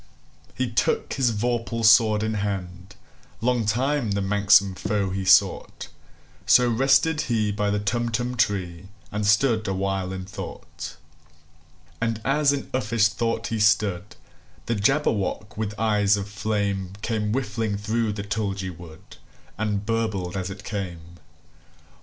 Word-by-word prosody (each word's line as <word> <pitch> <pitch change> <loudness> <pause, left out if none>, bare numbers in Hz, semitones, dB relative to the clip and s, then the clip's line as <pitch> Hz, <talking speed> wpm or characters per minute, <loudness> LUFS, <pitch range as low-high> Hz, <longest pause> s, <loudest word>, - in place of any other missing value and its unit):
He 130 - -1
took 115 - 0
his 130 -3 +2
vorpal 115 +1 -1
sword 110 -1 +5
in 110 0 -1
hand:Long 100 +4 -4
time 125 0 0
the 100 - -1
manxome 100 0 +4
foe 100 -1 -1
he 95 0 -3
sought—So 80 +3 +1
rested 135 +6 +3
he 110 -3 +1
by 105 0 -1
the 105 - 0
Tumtum 120 +4 -1
tree, 95 -6 -1 0.2
And 105 0 -2
stood 110 +1 +3
awhile 95 -1 -1
in 95 -1 -5
thought. 100 +1 -8 1.1
And 115 -1 -1
as 140 +1 +3
in 140 -1 -4
uffish 115 -4 +2
thought 115 0 -2
he 115 - -2
stood, 100 -2 +1 0.5
The 115 - -1
Jabberwock, 105 -3 0
with 105 -1 -3
eyes 105 -2 +3
of 100 0 -4
flame, 100 -2 -2
Came 105 -2 -1
whiffling 110 -4 -2
through 110 +1 -1
the 100 -1 -5
tulgey 100 -3 -3
wood, 85 +2 -13 0.4
And 105 -1 -2
burbled 110 -5 -2
as 95 -1 -3
it 100 +1 -9
came! 90 -4 -6
105 Hz, 130 wpm, -24 LUFS, 100-115 Hz, 1.1 s, sword